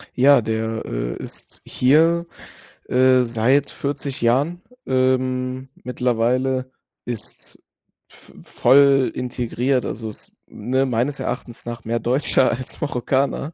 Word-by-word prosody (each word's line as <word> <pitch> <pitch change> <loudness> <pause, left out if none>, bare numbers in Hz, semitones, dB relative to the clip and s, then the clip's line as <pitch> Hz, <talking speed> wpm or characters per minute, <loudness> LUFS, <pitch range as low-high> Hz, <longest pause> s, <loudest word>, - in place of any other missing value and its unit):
Ja, 135 +1 +6
der, 110 0 -3
äh, - - -3
ist - - -7
hier, 165 +6 +3 0.6
äh, 130 0 +4
seit 120 +4 +1
40 140 -1 -4
Jahren, 140 +9 +1 0.2
ähm, 130 0 0
mittlerweile, 125 +1 0 0.3
ist 120 -3 -7 0.5
v - - -17
voll 140 -1 +4
integriert, 125 +1 -1
also, 110 +1 -5
ist, 105 - -11
ne, 130 +5 -1
meines 130 +3 -1
Erachtens 120 -2 -5
nach 120 -1 -6
mehr 115 +1 -1
Deutscher 130 +1 +2
als 125 +2 -5
Marokkaner. 140 +2 -1
130 Hz, 110 wpm, -21 LUFS, 120-135 Hz, 0.6 s, Ja